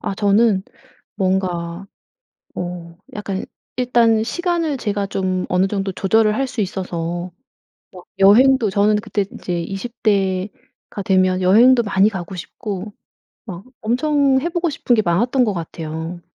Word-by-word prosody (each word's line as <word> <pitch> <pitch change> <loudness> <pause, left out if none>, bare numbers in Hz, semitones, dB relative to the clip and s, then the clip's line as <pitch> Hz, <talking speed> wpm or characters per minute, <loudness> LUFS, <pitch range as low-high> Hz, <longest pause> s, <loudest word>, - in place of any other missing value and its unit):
아 - - -3
저는 205 0 +3 0.5
뭔가 185 -2 -1 0.7
어 175 -1 -6 0.2
약간 195 -2 -4 0.3
일단 235 -3 +3
시간을 335 +4 -1
제가 205 -5 -2
좀 185 -1 -2
어느 185 +1 +2
정도 195 -1 -2
조절을 215 +3 +2
할 270 +4 0
수 250 -3 -5
있어서 175 -2 -3 0.6
막 180 - -12
여행도 230 +4 +5
저는 205 +1 +2
그때 210 -1 -2
이제 175 -1 -3
20 210 +7 -7
대가 195 -1 -2
되면 185 -1 +2
여행도 235 +7 +5
많이 200 0 +3
가고 190 -2 -6
싶고 200 +2 -6 0.5
막 185 -2 -8 0.2
엄청 270 +3 +2
해보고 340 +2 -1
싶은 255 -3 0
게 215 - +3
많았던 235 +9 +2
거 215 - 0
같아요. 165 0 -6
200 Hz, 245 characters per minute, -19 LUFS, 185-235 Hz, 0.7 s, 여행도